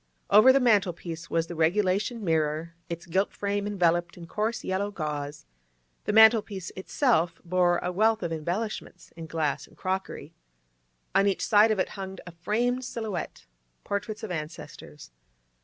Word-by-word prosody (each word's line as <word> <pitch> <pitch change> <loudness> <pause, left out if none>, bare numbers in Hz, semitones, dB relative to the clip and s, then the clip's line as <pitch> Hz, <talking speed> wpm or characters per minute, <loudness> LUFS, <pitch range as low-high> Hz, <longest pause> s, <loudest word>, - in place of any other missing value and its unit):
Over 215 +6 +8
the 275 - +4
mantel 210 -8 +3
piece 165 0 -8
was 165 0 +1
the 175 - -7
regulation 195 +7 +1
mirror, 160 -1 0 0.2
its 170 0 -5
gilt 190 +4 0
frame 205 0 -2
enveloped 175 -4 +1
in 170 - -9
coarse 215 +6 -2
yellow 195 +2 -1
gauze; 150 - -5 0.6
the - - 0
mantel 220 +1 +7
piece 195 -4 -7
itself 185 - +1
bore 175 0 +2
a 180 - -1
'wealth' 220 +3 +2
of 170 -1 -2
embellishments 180 +3 -4
in 165 -1 -8
glass 155 -4 -2
and - - -22
crockery. 190 +1 -4 0.8
On 200 - +4
each 195 - 0
side 210 +1 +5
of 215 - +1
it 185 - 0
hung 190 -1 -7
a 175 - -9
framed 235 +9 -1
silhouette, 220 -8 -5 0.4
portraits 210 +2 -4
of 215 - -5
ancestors. 155 - -8
185 Hz, 155 wpm, -27 LUFS, 165-210 Hz, 0.8 s, Over